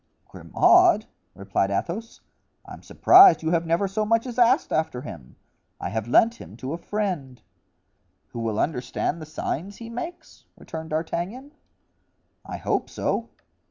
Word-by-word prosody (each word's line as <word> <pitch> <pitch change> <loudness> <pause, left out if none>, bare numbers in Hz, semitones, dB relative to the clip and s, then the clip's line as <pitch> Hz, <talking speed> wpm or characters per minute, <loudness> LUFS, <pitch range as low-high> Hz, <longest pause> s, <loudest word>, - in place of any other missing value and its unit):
"Grimaud!" - - +3 0.3
replied 100 0 -1
Athos. 185 - -4 0.4
"I'm - - -11
surprised 370 - +6
you 160 - 0
have 170 -1 0
never 170 +4 +1
so 195 +3 -2
much 230 +2 +1
as 250 -1 -5
asked 245 +5 +3
after 155 -6 -1
him. 60 - -10 0.4
I - - -4
have 110 +2 -3
lent 230 - +3
him - - -12
to 135 +3 -5
a - - -3
friend——" 175 -12 -4 0.9
"Who 120 - -7
will 110 -2 -2
understand 145 +3 -2
the 155 - -8
signs 180 +5 -5
he 230 0 -9
makes?" 335 +9 -8
returned 160 0 -8
D'Artagnan. 175 - -4 0.9
"I - - -7
hope - - -2
so." - - -2
170 Hz, 145 wpm, -24 LUFS, -, 0.9 s, surprised